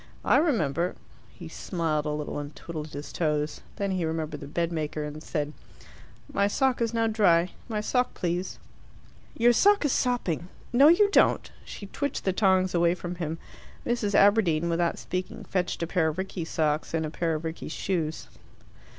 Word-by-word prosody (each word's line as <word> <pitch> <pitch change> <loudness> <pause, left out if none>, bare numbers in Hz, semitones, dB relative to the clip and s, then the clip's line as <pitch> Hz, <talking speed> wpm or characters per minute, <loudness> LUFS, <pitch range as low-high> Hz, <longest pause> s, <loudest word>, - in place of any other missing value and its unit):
I - - +5
remember 175 - +1 0.2
" - - -27
He 170 - -7
smiled 160 -2 -2
a - - 0
little, 150 0 -3
and 145 0 -7
twiddled 155 -2 -6
his 145 -1 -8
toes. 150 -2 -1
Then 200 -1 -2
he 185 -2 -1
remembered 160 -2 -3
the 140 - -8
bedmaker, 155 -1 -2
and 150 +1 -6
said, 150 -2 -3 0.8
"My 200 - +3
sock 260 +3 +1
is 230 -1 +1
now 230 -1 +1
dry. 185 -6 +3 0.2
My 215 -2 -1
sock, 250 +3 0
please." 175 +1 -2 0.8
"Your 240 +1 +5
sock 405 - +4
is 290 - +2
sopping. 210 - 0 0.3
No, 275 +4 +7
you 405 +5 +5
don't!" - - +3
She 205 - -9
twitched 285 +7 -3
the 190 - +1
tongs 185 -2 +3
away 170 0 +3
from 180 -1 -5
him. 165 -1 -3 0.5
Mrs. 225 -4 0
Aberdeen, 180 -6 +4
without 170 0 +1
speaking, 185 0 -5
fetched 180 -2 -2
a - - +1
pair 170 -1 +1
of 155 +1 -2
Rickie's 190 -3 -4
socks 155 0 0
and 160 -1 0
a 155 - -5
pair 165 -1 -1
of 155 - -4
Rickie's 160 -1 -5
shoes. 165 -3 -2
175 Hz, 175 wpm, -27 LUFS, 155-205 Hz, 0.8 s, No